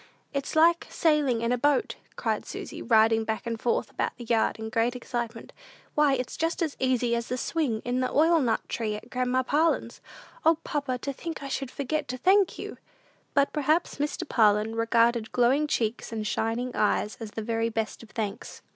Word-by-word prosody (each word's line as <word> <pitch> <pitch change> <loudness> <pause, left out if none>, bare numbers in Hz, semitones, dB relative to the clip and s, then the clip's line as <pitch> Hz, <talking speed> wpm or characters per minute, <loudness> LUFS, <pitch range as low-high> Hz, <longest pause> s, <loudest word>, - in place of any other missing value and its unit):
"It's 280 +1 -3
like 335 +2 +4
sailing 295 -8 +2
in 235 - +1
a 250 - +1
boat," 290 +1 +2 0.2
cried - - -1
Susy, - - -7
riding 225 -1 +4
back 220 +1 -3
and 230 -1 -4
forth 240 - 0
about - - -2
the 240 - -8
yard 230 -1 +1
in 220 0 -5
great 230 +3 +1
excitement; 240 -2 -5 0.4
"why, 295 -2 +4
it's 250 -1 -4
just 330 +2 0
as 310 -3 -2
easy 250 -2 +1
as 235 0 -3
the 250 - -2
swing 255 -6 -1
in 245 +1 0
the 255 - 0
oilnut 305 -7 +3
tree 215 -2 -2
at 230 +3 -10
grandma 255 +1 +1
Parlin's! 310 +5 0 0.4
O, 325 +1 +5
papa, 280 -4 -2
to 275 +3 -4
think 325 +1 -6
I 275 - -5
should 270 -1 -3
forget 290 +3 -2
to 255 - -4
thank 380 +6 +3
you!" - - -7 0.6
But 280 -1 +3
perhaps 305 +3 +1
Mr. 295 +1 -2
Parlin 215 -2 +3
regarded 230 0 +2
glowing 260 +5 +3
cheeks 230 -5 -1
and 220 -2 -3
shining 230 +4 -1
eyes 210 0 +1
as 225 -2 -6
the 220 +1 -5
very 230 +1 0
best 225 -1 -3
of 230 - -13
thanks. 215 -2 -5
245 Hz, 190 wpm, -27 LUFS, 225-290 Hz, 0.6 s, O